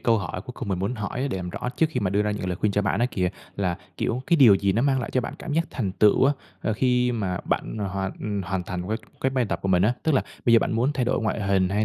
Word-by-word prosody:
câu 115 -2 +3
hỏi 90 -1 -4
cuối 125 - -8
cùng 120 - -6
mình 95 -2 -1
muốn 100 +6 -1
hỏi 120 +5 -3
để 95 - -2
làm 90 -1 -4
rõ 125 - -4
trước 160 - +4
khi 125 - -2
mà 95 -3 0
đưa 100 +1 +2
ra 105 - 0
những 105 -3 -3
lời 90 -1 -2
khuyên 105 0 0
cho 105 - +1
bạn 100 +1 0
á 120 - +4
kìa, 90 -2 0 0.3
là, 90 -3 0 0.2
kiểu, 125 +3 -1
cái 170 - +4
điều 120 -9 +8
gì 95 0 +1
nó 115 - +1
mang 135 -1 +2
lại 120 - -4
cho 130 - +2
bạn 120 - -5
cảm 155 - -5
giác 165 +2 +2
thành 100 -8 -2
tựu 105 +5 +4
á, 140 - +5 0.3
ờ, 110 - 0
khi 125 +1 +2
mà 95 -6 -2
bạn 110 - -2
hoàn 100 +1 -3
hoàn 95 0 -2
thành 90 +1 -5
cái 110 - 0 0.2
cái 130 - +1
bài 130 -2 +1
tập 105 - -2
của 95 - -1
mình 90 -1 +4
á, 110 +5 +4
tức 160 - +2
là 130 - +3 0.2
bây 120 - +4
giờ 115 - +8
bạn - - -1
muốn 125 +6 +1
thay 125 -4 0
đổi 125 - +1
ngoại 110 - -1
hình 95 -2 +2
hay 105 +2 +1
105 Hz, 315 wpm, -25 LUFS, 95-125 Hz, 0.3 s, điều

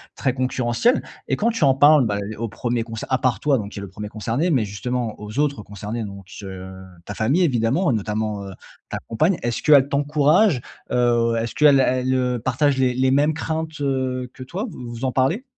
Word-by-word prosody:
très 130 -3 0
concurrentiel 130 - +1 0.3
et - - +1
quand 230 +3 +1
tu 225 -7 -1
en 135 - +5
parles 145 0 +6
bah 105 -2 -1 0.2
au 115 - -3
1er 120 +2 -2
concer 115 -1 -6
à 130 - +2
part 130 -2 0
toi 145 -2 +2
donc 105 -3 -5
qui - - -7
est - - -6
le 100 - -6
1er 105 +3 -7
concerné 115 - -1
mais 125 -8 +2
justement 115 +3 -3
aux 105 +5 -6
autres 145 -6 0
concernés 105 +3 -5
donc 100 -2 -9 0.2
heu, 95 -1 -8 0.3
ta 105 - -6
famille 135 - +2
évidemment, 135 +4 +1
notamment, 105 -1 -2
heu, - - -7 0.4
ta - - -3
compagne. 155 +10 +2
Est-ce 120 -1 -2
qu'elle 140 -3 +6
t'encourage? 145 - +3 0.3
Heu, 120 -1 +2
est-ce 115 0 -2
qu'elle 145 -2 +6
elle, 130 0 +1
heu, 125 -1 0
partage 130 +4 +1
les 130 -1 +2
les 130 +1 +2
mêmes 145 +3 +3
craintes, 160 -1 -4
heu, 130 -2 -1
que 130 - -9
toi? 185 - -4
Vous 125 -9 -9
vous 120 +2 -5
en 130 - 0
parlez? 135 - +1
130 Hz, 210 wpm, -22 LUFS, 115-145 Hz, 0.4 s, parles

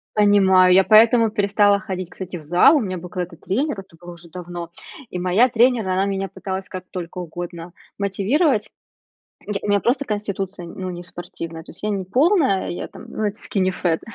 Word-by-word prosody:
Понимаю, 190 -3 +5
я 190 - +6
поэтому 225 +1 +5
перестала 205 0 +3
ходить, 185 -4 -6
кстати, 185 -1 -7
в 155 - -11
зал, 175 - +5
у - - +4
меня 185 -6 -3
был 180 +1 -9
когда-то 180 -2 -5
тренер, 215 - -2
это 190 -3 -13
был 175 0 -10
уже 170 -1 -14
давно, 175 0 -7 0.4
и 180 - -5
моя 185 +8 +3
тренер, 235 -3 +3
она 190 +1 +1
меня 195 -1 -2
пыталась 190 0 -6
как 185 -1 -6
только 180 -1 -6
угодно 175 0 -7 0.2
мотивировать. 210 - +1 0.8
Й 205 -1 -3
у - - -3
меня 205 0 +3
просто 270 +6 0
конституция, 200 -4 -4
ну, 185 +2 -6
не 175 0 -7
спортивная, 165 -2 -8
то - - -18
есть 175 - -14
я 210 - 0
не 195 -2 -2
полная, 265 - +2
я 175 - -5
там, - - -13
ну 215 - -3
это 205 +1 -3
"скини 190 -2 -1
фэт". 175 -3 -1
190 Hz, 195 wpm, -21 LUFS, 180-210 Hz, 0.8 s, я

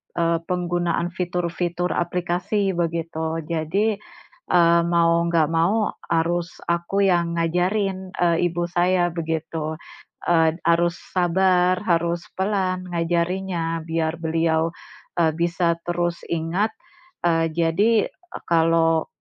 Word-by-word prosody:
eee, 170 -1 +1
penggunaan 175 -1 -1
fitur-fitur 175 0 -2
aplikasi, 180 +3 -1
begitu. 165 -2 -2
Jadi, 175 +7 0 0.5
eee, 170 -1 +5
mau 170 -1 +3
nggak 165 -2 +2
mau, 180 +7 +2 0.2
harus 170 +1 -1
aku 170 +4 0
yang 170 -1 +1
ngajarin, 185 +3 0
eee, 170 0 +2
ibu 175 0 -2
saya, 175 0 +2
begitu. 160 -1 -3 0.5
Ed 165 0 +2
harus 170 +1 +2 0.2
sabar, 180 +1 +2
harus 170 -2 +1 0.2
pelan 185 -2 0
ngajarinnya, 170 0 -1
biar 160 0 -1
beliau, 165 0 +1 0.5
eee, 165 -2 +4
bisa 170 0 +1
terus 175 0 -2
ingat, 170 +6 0 0.6
eee, 165 -1 +2
jadi 185 +7 +2 0.4
kalau 165 -1 +3
170 Hz, 105 wpm, -23 LUFS, 165-180 Hz, 0.6 s, eee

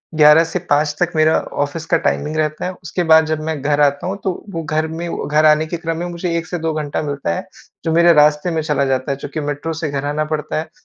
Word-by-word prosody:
11 150 +1 +7
से 175 +2 -3
5 145 +1 +2
तक 175 0 +1
मेरा 155 0 +4 0.3
ऑफिस 155 +3 -5
का 165 - +5
टाइमिंग 155 -1 -1
रहता 155 +2 -1
है। 185 - -2
उसके 175 +2 -2
बाद 160 -1 +6
जब 155 0 -2
मैं 155 -3 -3
घर 145 +1 +1
आता 145 +3 +2
हूँ, 195 +2 -3
तो 190 - +1 0.2
वो 165 -4 -4
घर 155 +1 -1
में 165 +2 -5 0.2
घर 150 +1 +3
आने 155 +1 +5
के 170 +2 -4
क्रम 165 -1 -3
में 175 - -3
मुझे 170 0 -3
1 165 - -3
से 175 - -3
2 160 0 -1
घंटा 150 -2 -2
मिलता 140 - -2
है। - - -6 0.4
जो 165 - +1
मेरे 170 +1 +6
रास्ते 150 +2 +3
में 160 -1 0
चला 150 -2 0
जाता 130 +1 -1
है - - 0
चूँकि 145 +3 -6
मेट्रो 145 +2 -3
से 155 - -1
घर 140 0 -3
आना 150 +1 -1
पड़ता 155 -1 -3
है, 160 - -6
155 Hz, 260 wpm, -18 LUFS, 150-165 Hz, 0.4 s, 11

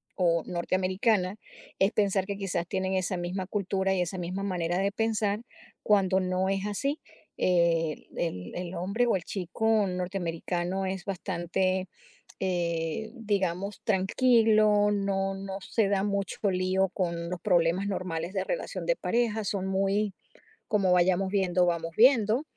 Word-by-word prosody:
o 170 -3 +2
norteamericana 185 +3 0 0.4
es 195 +2 +4
pensar 195 -2 +1
que 200 0 -3
quizás 180 -3 -2
tienen 190 0 -1
esa 185 0 0
misma 180 +2 -3
cultura 195 -1 0
y 180 - +1
esa 180 +2 -3
misma 180 +3 -3
manera 175 -2 -1
de 200 +1 +1
pensar, 215 -1 0 0.4
cuando 190 -2 +3
no 185 0 0
es 195 +1 -1
así, 275 +9 -2 0.4
eh, 170 -3 +1
el 90 - -3
el 180 0 -5
hombre 200 +7 0
o 225 - +3
el 175 - -2
chico 210 +3 0
norteamericano 180 0 -2
es 190 -1 -4
bastante, 185 0 -1 0.5
eh, 175 +2 -1
digamos, 200 -3 -2
tranquilo, 215 0 +4
no 195 -1 0
no 195 0 -5
se 220 -4 +2
da 200 0 +1
mucho 200 -2 -2
lío 185 +1 +1
con 170 -2 -2
los 180 -1 -4
problemas 175 +3 +2
normales 180 -2 -3
de 190 - 0
relación - - -4
de - - +3
pareja, 225 -2 0
son 195 -1 -2
muy 195 +1 0 0.5
como: 200 -4 +2
"Vayamos 180 +1 +3
viendo, 185 -3 +2
vamos 170 -1 -1
viendo". 235 +1 +5
190 Hz, 145 wpm, -28 LUFS, 180-205 Hz, 0.5 s, viendo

